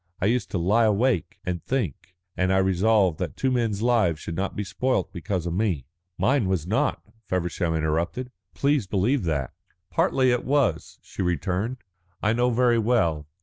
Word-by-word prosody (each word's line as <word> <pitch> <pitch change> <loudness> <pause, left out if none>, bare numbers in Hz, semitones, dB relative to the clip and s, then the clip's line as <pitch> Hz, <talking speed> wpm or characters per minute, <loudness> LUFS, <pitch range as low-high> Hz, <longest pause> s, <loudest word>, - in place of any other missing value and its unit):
I - - 0
used 120 +4 +1
to - - -2
lie 105 +7 +3
awake 110 - +1
and 90 -3 -3
think, 95 - -3 0.2
and 95 0 +1
I 95 - +3
resolved 95 -1 +3
that - - -4
two 130 - +1
men's 115 -4 0
lives 110 -10 +2
should 85 - -6
not 95 +2 -2
be 105 - -2
spoilt 125 +1 -1
because 90 -1 -3
of 85 - -2
me." 90 - 0 0.3
"Mine 130 -6 +2
was 95 -5 0
not," 105 +5 0 0.2
Feversham 85 -2 -1
interrupted. 85 +11 -1 0.2
"Please 140 -7 +1
believe 105 +5 +1
that." 70 -5 -1 0.4
"Partly 130 -1 +2
it 120 - 0
was," 135 - 0
she - - -7
returned, 90 - -1 0.4
"I 110 +1 +1
know 120 +1 +2
very 120 -1 +3
well. 100 -11 +1
100 Hz, 170 wpm, -25 LUFS, 85-120 Hz, 0.4 s, lie